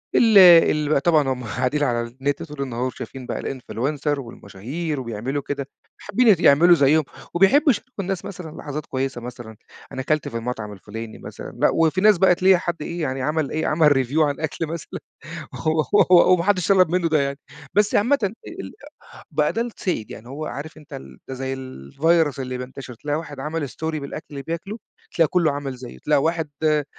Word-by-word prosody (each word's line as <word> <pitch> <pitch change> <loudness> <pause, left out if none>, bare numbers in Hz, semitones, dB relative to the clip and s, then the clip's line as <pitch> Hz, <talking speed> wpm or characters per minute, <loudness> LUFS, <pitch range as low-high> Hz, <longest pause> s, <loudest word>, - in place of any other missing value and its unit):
ال 225 -3 +5
ال 165 -5 +7
بقى، 145 -2 +2
طبعًا 155 -4 +3
هُم 130 -1 -3
قاعدين 130 +6 -1
على 120 -4 +1
النت 135 +4 -3
طول 150 -3 -8
النهار 125 -3 -4
وشايفين 130 0 -8
بقى - - -4
الinfluencer 140 +3 -2
والمشاهير 135 - -6
وبيعملوا 125 +3 -3
كده، 140 -1 -4 0.3
فحابِين 235 -4 +3
يعملوا 170 +4 +6
زيهُم 155 +1 +4 0.3
وبيحبوا 195 - +4
يشاركوا 225 - -5
الناس 190 -1 -3
مثلًا 170 -5 -8
لحظات 150 0 -6
كويِسة 130 -2 -3
مثلًا، 120 -2 -9 0.3
أنا 130 - -4
كلت 155 +2 0
في 115 - -4
المطعم 115 -3 -5
الفُلاني 110 +3 -8
مثلًا، - - -9
لأ. - - +4
وفي 165 +3 +2
ناس 210 -1 +6
بقى 185 0 +5
تلاقي 185 +1 +5
حد 175 0 -3
إيه 170 +3 -5
يعني، 130 -3 -2
عمل 150 +2 -1
إيه، 155 +1 -1
عمل 155 -1 +4 0.2
review 140 +6 -1
عن 145 -2 +1
أكل 160 +1 -3
مثلًا 165 0 -6 1.1
و 180 0 +7
وما 175 -2 +3
حدش 190 -3 +1
طلَب 185 -4 +5
منه 175 -1 +1
ده 155 -2 +2
يعني. 140 0 -2 0.4
بس 210 +1 +2
عامةً 250 +8 +3
ال 200 +2 -1 1.0
بقى - - +1
ده 230 - 0
السائِد. 185 - -4
يعني 115 +1 -10
هو 150 +4 -6
عارِف 155 +2 -7
أنتَ 150 -2 -17
ال 65 -2 -10
ده 135 - -5
زي 130 +1 -3
الvirus 140 - 0
اللي 130 -1 -4
بينتشِر، 125 0 -8
تلاقي 145 +5 -3
واحد 150 -4 -8
عمل 150 +1 -3
story - - -14 0.3
بالأكل 140 +2 -7
اللي 140 -2 -6
بياكُله، 170 +8 -5 0.4
تلاقي 165 -3 +3
كُلُّه 170 -3 +2
عمل 140 -2 -4
زيه، 125 -1 -10
تلاقي 150 -2 +1
واحد 160 -1 -1
آآ، 150 -1 +2
150 Hz, 185 wpm, -22 LUFS, 130-170 Hz, 1.1 s, ال